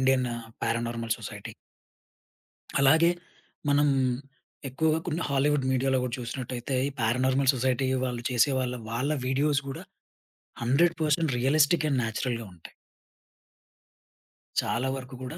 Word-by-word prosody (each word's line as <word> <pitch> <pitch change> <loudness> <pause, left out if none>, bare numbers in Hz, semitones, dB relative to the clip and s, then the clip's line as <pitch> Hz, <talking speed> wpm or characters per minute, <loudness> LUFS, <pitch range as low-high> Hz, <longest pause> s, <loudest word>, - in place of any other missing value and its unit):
Indian 130 -1 +3 0.4
paranormal 115 0 -1
society. - - -8 1.3
అలాగే 160 +5 +5 0.6
మనం 145 +1 +4 0.8
ఎక్కువగా 155 +4 +1
కొన్ని 170 +1 -1
హాలీవుడ్ 140 0 +2
మీడియా‌లో 130 0 +2
గూడా 125 -2 -2
చూషినట్టయితే, 125 +1 -4
ఈ - - -2
పారానార్మల్ 130 +4 +3
సొసైటీ 130 +1 +1 0.2
వాళ్ళు 120 -2 -4
చేసే 125 +3 +3
వాళ్ళ 125 -1 -2
వాళ్ళ 125 +6 -1 0.2
వీడియోస్ 140 +2 +2
గూడా 135 - -6 0.8
100% 155 +3 +2
రియలిస్టిక్ 150 +5 +3
అండ్ 135 -2 +2
న్యాచురల్‌గా 115 +1 -2
ఉంటాయి. 85 -2 -14 1.9
చాలా 125 +3 -1
వరకు 130 0 -9
కూడా 150 +7 -6
130 Hz, 110 wpm, -27 LUFS, 125-145 Hz, 1.9 s, అలాగే